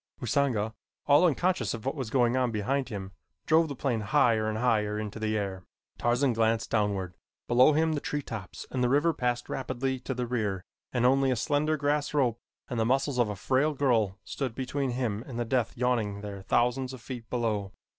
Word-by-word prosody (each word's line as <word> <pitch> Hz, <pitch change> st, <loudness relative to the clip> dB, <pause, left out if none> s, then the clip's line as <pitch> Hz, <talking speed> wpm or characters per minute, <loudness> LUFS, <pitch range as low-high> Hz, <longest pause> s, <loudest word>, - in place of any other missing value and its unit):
Usanga, 120 Hz, -3 st, 0 dB, 0.3 s
all 150 Hz, +5 st, +6 dB
unconscious 160 Hz, -, 0 dB
of 115 Hz, -, -10 dB
what 135 Hz, -, 0 dB
was 130 Hz, -7 st, -4 dB
going 120 Hz, 0 st, +2 dB
on 130 Hz, -1 st, +2 dB
behind 125 Hz, +5 st, -1 dB
him, 100 Hz, -4 st, -6 dB, 0.3 s
drove 160 Hz, +1 st, +4 dB
the 140 Hz, -, -5 dB
plane 125 Hz, -4 st, -1 dB
higher 110 Hz, -1 st, +2 dB
and 110 Hz, -, -2 dB
higher 110 Hz, -3 st, +1 dB
into 105 Hz, 0 st, -5 dB
the 110 Hz, 0 st, 0 dB
air. 95 Hz, -3 st, -3 dB, 0.4 s
Tarzan 120 Hz, +2 st, +2 dB
glanced 115 Hz, 0 st, +1 dB
downward. 100 Hz, -4 st, 0 dB, 0.3 s
Below 125 Hz, +5 st, +6 dB
him 160 Hz, +1 st, +2 dB
the 145 Hz, -, -2 dB
tree 145 Hz, -1 st, -3 dB
tops 105 Hz, -8 st, -7 dB
and 125 Hz, -1 st, 0 dB
the 125 Hz, -, +3 dB
river 145 Hz, +5 st, +3 dB
passed 120 Hz, -2 st, -1 dB
rapidly 130 Hz, 0 st, -2 dB
to 130 Hz, +1 st, -4 dB
the 125 Hz, 0 st, -2 dB
rear 105 Hz, -6 st, -2 dB, 0.3 s
and 125 Hz, -1 st, +1 dB
only 135 Hz, +1 st, +4 dB
a 130 Hz, -, +2 dB
slender 150 Hz, +5 st, +1 dB
grass 145 Hz, +1 st, 0 dB
rope 120 Hz, -5 st, +2 dB, 0.3 s
and 120 Hz, -, -3 dB
the -, -, +3 dB
muscles 135 Hz, +2 st, +1 dB
of 120 Hz, -3 st, +3 dB
a 105 Hz, -, -3 dB
frail 135 Hz, +9 st, +1 dB
girl 115 Hz, -8 st, +2 dB
stood 130 Hz, -5 st, -4 dB
between 135 Hz, +1 st, -2 dB
him 120 Hz, -4 st, -2 dB
and 125 Hz, -4 st, -6 dB
the 120 Hz, -, -1 dB
death 120 Hz, -1 st, 0 dB
yawning 115 Hz, -5 st, 0 dB
there 100 Hz, -2 st, -6 dB
thousands 125 Hz, +5 st, +1 dB
of 130 Hz, -, -9 dB
feet 115 Hz, -2 st, -8 dB
below. 110 Hz, -5 st, -1 dB
125 Hz, 200 wpm, -28 LUFS, 110-135 Hz, 0.4 s, all